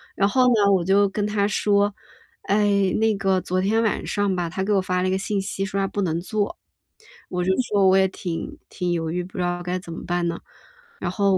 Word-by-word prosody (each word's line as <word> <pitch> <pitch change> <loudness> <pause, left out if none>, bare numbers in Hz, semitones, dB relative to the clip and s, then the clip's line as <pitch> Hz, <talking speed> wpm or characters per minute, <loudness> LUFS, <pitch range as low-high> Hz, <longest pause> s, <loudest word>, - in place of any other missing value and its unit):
然 200 - +3
后 255 +3 +3
呢， 210 -5 +4
我 180 -3 +2
就 200 +2 +4
跟 205 +1 -2
她 205 -1 +1
说： 205 -1 +2 0.5
“哎， 200 -2 +2
那 220 -1 +2
个 190 -1 +1
昨 185 +1 -1
天 220 +4 +2
晚 220 - -1
上 205 -2 0
吧， 175 -2 -2
他 190 +2 -3
给 210 +1 0
我 195 - +3
发 180 0 -1
了 185 - +1
一 - - 0
个 190 - +1
信 195 0 -1
息， 195 0 -3
说 195 +1 -3
他 195 - +1
不 205 - -3
能 165 -2 0
做。” 205 +2 -2 0.7
我 180 -1 -2
就 190 - +2
说： 200 -4 +2
“我 190 - +5
也 190 0 +4
挺 175 -3 -5
挺 180 -1 -2
犹 165 -2 -1
豫， 175 +2 -2
不 180 - -13
知 180 - 0
道 175 0 -2
该 180 +1 -2
怎 170 -2 -10
么 - - -7
办 175 0 0
呢。” 170 - -3 0.6
然 175 - -2
后 195 -1 +2
195 Hz, 260 characters per minute, -23 LUFS, 180-205 Hz, 0.7 s, 我